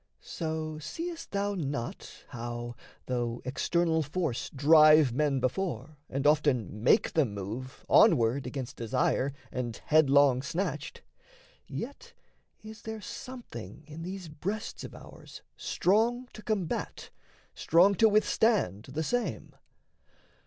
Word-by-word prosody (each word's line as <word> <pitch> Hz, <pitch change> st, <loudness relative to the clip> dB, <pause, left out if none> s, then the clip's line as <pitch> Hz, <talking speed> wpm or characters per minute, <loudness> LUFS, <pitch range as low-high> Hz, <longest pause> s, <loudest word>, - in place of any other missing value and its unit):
So 155 Hz, -1 st, -4 dB
seest 330 Hz, -, -6 dB
thou 200 Hz, 0 st, -1 dB
not, 140 Hz, -9 st, -5 dB
how, 120 Hz, 0 st, -5 dB, 0.3 s
though 120 Hz, -2 st, -2 dB
external 160 Hz, +5 st, +1 dB
force 155 Hz, -3 st, -2 dB
Drive 155 Hz, -1 st, +6 dB
men 140 Hz, 0 st, +1 dB
before, 140 Hz, -, -3 dB
and 135 Hz, +2 st, -3 dB
often 140 Hz, -, +2 dB
make 120 Hz, -, +3 dB
them 135 Hz, -11 st, +1 dB
move, 110 Hz, +7 st, -7 dB
Onward 120 Hz, +3 st, +4 dB
against 125 Hz, -1 st, -6 dB
desire, 130 Hz, +3 st, 0 dB, 0.2 s
and 120 Hz, -3 st, -4 dB
headlong 140 Hz, -4 st, +5 dB
snatched, 170 Hz, +7 st, -4 dB, 0.6 s
Yet 455 Hz, -, -7 dB, 0.5 s
is 215 Hz, -1 st, -10 dB
there 220 Hz, 0 st, -6 dB
something 205 Hz, -, -9 dB
in 155 Hz, +2 st, -9 dB
these 185 Hz, +1 st, -6 dB
breasts 190 Hz, +8 st, -5 dB
of -, -, -8 dB
ours -, -, -12 dB
Strong 235 Hz, +6 st, +1 dB
to 215 Hz, -, -10 dB
combat, 205 Hz, -7 st, -3 dB, 0.4 s
strong 180 Hz, +5 st, +4 dB
to 220 Hz, +3 st, +5 dB
withstand 210 Hz, -, +2 dB
the 145 Hz, +4 st, -3 dB
same? 245 Hz, +8 st, -2 dB
155 Hz, 115 wpm, -29 LUFS, 125-195 Hz, 0.6 s, Drive